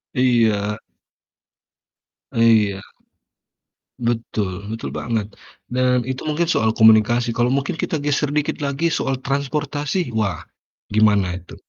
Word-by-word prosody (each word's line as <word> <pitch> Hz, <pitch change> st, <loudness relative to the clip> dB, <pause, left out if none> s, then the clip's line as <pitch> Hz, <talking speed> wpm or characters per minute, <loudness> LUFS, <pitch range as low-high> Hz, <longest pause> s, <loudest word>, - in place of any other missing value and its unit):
Iya. 110 Hz, -5 st, +2 dB, 1.6 s
Iya. 110 Hz, -4 st, +3 dB, 1.2 s
Betul 110 Hz, -5 st, -2 dB
betul 115 Hz, -, -5 dB
banget. 110 Hz, -3 st, -3 dB, 0.3 s
Dan, 125 Hz, 0 st, +2 dB
itu 130 Hz, +4 st, -5 dB
mungkin 160 Hz, +2 st, 0 dB
soal 110 Hz, -8 st, +2 dB
komunikasi 110 Hz, +2 st, +5 dB
kalau 120 Hz, +1 st, +1 dB
mungkin 145 Hz, +5 st, -2 dB
kita 155 Hz, -3 st, -2 dB
geser 145 Hz, 0 st, 0 dB
dikit 150 Hz, -1 st, -1 dB
lagi 145 Hz, +3 st, -1 dB
soal 135 Hz, -4 st, -2 dB
transportasi, 145 Hz, +4 st, -2 dB
wah, 105 Hz, -7 st, -1 dB, 0.5 s
gimana 100 Hz, -4 st, +2 dB
itu? 90 Hz, -, -13 dB
120 Hz, 110 wpm, -21 LUFS, 110-140 Hz, 1.6 s, komunikasi